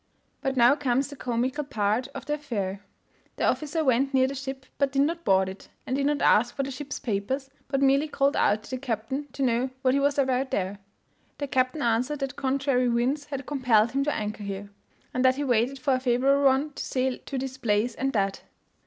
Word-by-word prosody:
But 270 0 -1
now 240 +2 +7
comes 275 -1 0
the 285 - -8
comical 255 +3 -1
part 220 -2 0
of - - -6
the 295 - -1
affair. 205 -10 -3 0.5
The - - -1
officer 310 +1 0
went 270 +1 +2
near 260 0 +5
the 265 - -2
ship, 265 -1 -6
but 280 -1 +2
did 275 0 +3
not 335 +3 -1
board 190 - +3
it, 190 +1 -9 0.2
and 260 - -1
did 280 0 +1
not 290 -1 0
ask 240 +3 +4
for 275 - -1
the 275 - -4
ship's 285 +2 -5
papers, 260 +5 -3 0.2
but 275 0 0
merely 275 +3 +4
called 280 -1 +1
out 215 +1 +2
to - - -12
the 260 - -2
captain 255 +3 -3
to 275 - -2
know 245 +1 +1
what 255 -1 +4
he 280 - +3
was 285 +1 +1
about 265 -1 +1
there? 195 -1 -2 0.6
The 285 - -2
captain 260 +1 0
answered 240 +5 +1
that 275 -2 -4
contrary 265 -2 +1
winds 255 +5 0
had 275 -2 -5
compelled 240 -6 +2
him 275 +1 +1
to 295 - 0
anchor 210 0 -4
there, 200 0 -5 0.4
and 255 - 0
that 260 0 +5
he 290 - -2
waited 250 +1 +1
for 270 +1 +1
a 255 - +2
favourable 265 +3 +2
one 270 +3 +3
to - - -5
sail 260 -1 -1
to 275 - -3
this 260 0 -4
place 225 0 +1
and 270 +1 -1
that. 195 -3 0
265 Hz, 220 wpm, -26 LUFS, 235-275 Hz, 0.6 s, now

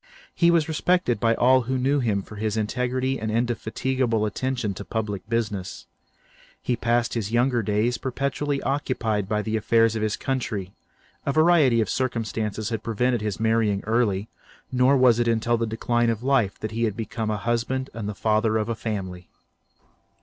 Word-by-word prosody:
He 170 - +3
was 170 -2 +3
respected 160 - +1
by 115 +1 +2
all 130 +2 +4
who 130 +2 -2
knew 135 +3 +1
him 105 -6 0
for 105 - -11
his 110 +1 -1
integrity 125 +4 -1
and 110 - -3
indefatigable 120 0 0
attention 120 -1 -2
to 100 - -7
public 105 -1 -4
business. 105 -5 -3 0.7
He 125 - -1
passed 120 0 0
his 110 -3 -2
younger 120 0 +2
days 110 +3 0
perpetually 140 +2 -2
occupied 115 -7 -1
by 105 0 0
the 110 +1 -2
affairs 115 +1 +3
of 110 - -2
his 110 -1 -1
country; 105 -8 -3 0.5
a - - 0
variety 155 -6 +4
of 110 - 0
circumstances 110 -4 -2
had 115 -3 -3
prevented 120 +1 0
his 105 -2 -3
marrying 110 -3 +1
early, 110 -3 +1 0.4
nor 130 +2 +4
was 125 -3 +5
it 120 - +1
until 115 +1 +2
the 115 0 -1
decline 120 +2 0
of 115 0 -2
life 130 -7 +2
that 110 - -3
he 115 0 0
became 110 +1 -4
a 105 - 0
husband 120 +4 -2
and 110 -2 -4
the 105 - -5
father 110 +1 +1
of 110 +1 -2
a 115 - -1
family. 95 -5 -5
115 Hz, 170 wpm, -24 LUFS, 110-125 Hz, 0.7 s, was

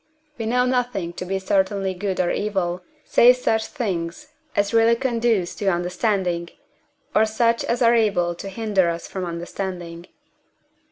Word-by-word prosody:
We 225 - -2
know 250 +2 +2
nothing 245 -9 -1
to 180 - -6
be 195 +1 -1
certainly 190 0 0
good 190 0 -3
or 180 -1 +2
evil, 185 -4 -1 0.2
save 245 +1 +6
such 220 -3 0
things 180 - -4 0.3
as 200 +1 +1
really 230 0 +5
conduce 230 -7 0
to 205 - -3
understanding, 180 -1 0 0.6
or 215 - +5
such 230 +1 +1
as 240 +1 0
are 235 0 +5
able 200 -7 +2
to 195 +3 -7
hinder 200 -4 +1
us 170 0 -4
from 190 -2 -4
understanding. 175 0 -6
195 Hz, 150 wpm, -22 LUFS, 175-230 Hz, 0.6 s, save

